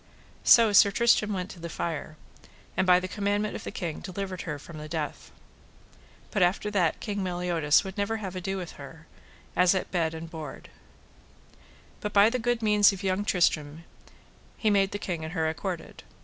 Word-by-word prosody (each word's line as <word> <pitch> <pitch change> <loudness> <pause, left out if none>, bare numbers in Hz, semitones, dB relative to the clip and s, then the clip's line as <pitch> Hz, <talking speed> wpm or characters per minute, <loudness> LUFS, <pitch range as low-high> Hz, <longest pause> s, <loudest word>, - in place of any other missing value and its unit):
So 225 -3 +7
Sir 200 0 +7
Tristram 215 0 +3
went 185 -1 -3
to 175 - -12
the 170 0 -6
fire, 155 -2 -4 0.6
and 185 - +1
by 180 0 +7
the 185 - -4
commandment 205 +1 -1
of - - -6
the - - -5
king 170 -4 -4
delivered 185 0 -5
her 150 - -3
from 155 +2 -11
the 155 0 -8
death. 155 -2 -4 1.0
But 205 - 0
after 185 +4 +2
that 180 -6 +1
King 205 -2 -3
Meliodas 175 -4 +2
would 190 +1 -7
never 200 +2 0
have 190 -4 -6
ado 190 +1 -3
with 180 -3 -6
her, 160 +3 -11 0.5
as 180 +1 +4
at 190 - -3
bed 165 -3 0
and 160 +1 -7
board. 160 -4 -9 1.3
But 210 - -4
by 205 +2 +6
the 255 - -1
good 240 0 -1
means 210 -1 +5
of 195 0 -7
young 190 +1 0
Tristram 160 -5 0 0.7
he 215 - +1
made 195 -1 +3
the 205 - -4
king 175 -5 -4
and 160 +1 -6
her 160 -3 0
accorded. 170 +2 -5
185 Hz, 185 wpm, -27 LUFS, 165-205 Hz, 1.3 s, So